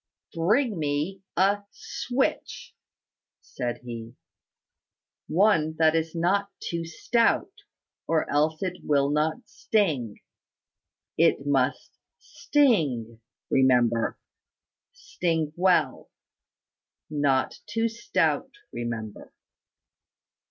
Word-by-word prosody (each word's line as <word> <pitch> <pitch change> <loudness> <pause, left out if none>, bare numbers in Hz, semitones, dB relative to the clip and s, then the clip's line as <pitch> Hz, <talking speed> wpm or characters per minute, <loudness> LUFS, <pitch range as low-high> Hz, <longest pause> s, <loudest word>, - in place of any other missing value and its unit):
"Bring 210 +5 +1
me 150 +6 -2 0.2
a 200 +3 +3
switch" 255 +5 -3 0.7
said 120 -2 -5
he. 115 -1 -8 1.1
"One 165 -4 +2
that 160 0 +4
is 165 +1 -1
not 195 +4 +1
too 170 -1 -4
stout, 230 - +1 0.6
or 160 -1 +1
else 155 +4 +1
it 180 -1 -3
will 140 -1 +2
not 155 +1 -1
sting. 155 - -1 1.0
It 165 -4 +3
must 135 -1 0 0.2
sting, 140 - 0 0.3
remember, 120 -3 +3 0.7
sting 165 - -2
well. 180 0 +1 1.0
Not 140 -3 +1
too 225 +2 0
stout, 230 +1 0 0.2
remember." 115 -3 -6
160 Hz, 80 wpm, -26 LUFS, 135-195 Hz, 1.1 s, that